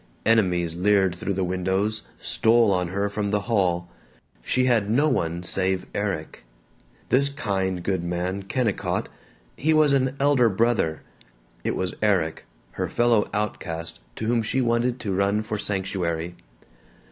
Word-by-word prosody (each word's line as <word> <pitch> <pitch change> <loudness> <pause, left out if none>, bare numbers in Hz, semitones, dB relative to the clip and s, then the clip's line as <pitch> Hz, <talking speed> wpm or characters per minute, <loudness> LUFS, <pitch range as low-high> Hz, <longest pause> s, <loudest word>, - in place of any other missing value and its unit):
Enemies 90 -7 +2
leered 95 0 +3
through 95 +2 -3
the 95 - 0
windows, 95 +4 -1 0.2
stole 115 -1 +3
on 90 -2 +1
her 100 +3 -1
from 100 0 -2
the 105 0 +1
hall. 90 -6 0 0.6
She 130 - +1
had 115 -5 +2
no 140 +8 +3
one 85 - -1
save 95 +1 0
Erik. 95 -11 -3 0.7
This 140 +2 +3
kind 95 -9 -2
good 95 -3 -1
man 90 +3 -2
Kennicott 105 +2 -1 0.5
he 155 +3 +2
was 150 -2 +5
an 130 -1 +1
elder 135 -4 +4
brother. 105 -7 +1 0.6
It - - -1
was 95 -1 -2
Erik, 95 -7 +1 0.3
her - - -3
fellow 120 -3 +2
outcast, 85 -6 -3 0.2
to 110 - -4
whom 115 +1 +2
she 115 +4 -1
wanted 120 0 +1
to 100 - -2
run 100 +3 +1
for 105 -1 -4
sanctuary. 90 -4 -2
100 Hz, 145 wpm, -24 LUFS, 90-115 Hz, 0.7 s, was